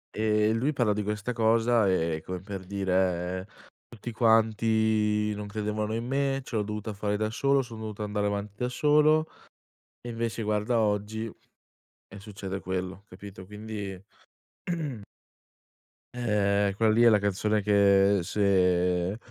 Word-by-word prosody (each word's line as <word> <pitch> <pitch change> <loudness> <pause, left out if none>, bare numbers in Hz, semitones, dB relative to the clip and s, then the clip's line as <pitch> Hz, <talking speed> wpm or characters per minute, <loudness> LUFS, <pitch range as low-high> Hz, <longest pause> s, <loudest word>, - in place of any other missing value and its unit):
E 105 0 +2
lui 130 +7 0
parla 120 -6 +1
di 105 - -2
questa 105 +4 -3
cosa, 115 -1 +3
e 80 -3 0
come 90 0 -5
per 95 0 -7
dire: 95 -1 -1 0.4
"Tutti 120 +1 -8
quanti 110 -2 +2
non 105 0 -6
credevano 105 +1 -3
in 115 +1 -3
me, 135 +1 0
ce 125 - -7
l'ho 110 - +2
dovuta 105 +1 -4
fare 105 0 -2
da 110 +1 -1
solo, 140 +3 +2
son 115 -3 -10
dovuto 110 -1 -6
andare 105 0 -1
avanti 100 0 -3
da 125 +1 -1
solo 150 +4 +3 0.7
e 120 - -9
invece 115 0 -3
guarda 105 +2 0
oggi 110 +1 -1 0.8
e 100 - -11
succede 95 -2 -6
quello," 95 +1 -5
capito, 95 0 -11
quindi 105 -1 -6 2.2
ehm, 100 -4 +1
quella 110 +1 +3
lì 110 +2 +3
è 120 - +8
la 110 - +5
canzone 100 +1 0
che 100 -1 +4
se 90 -1 +1
105 Hz, 140 wpm, -27 LUFS, 100-115 Hz, 2.2 s, è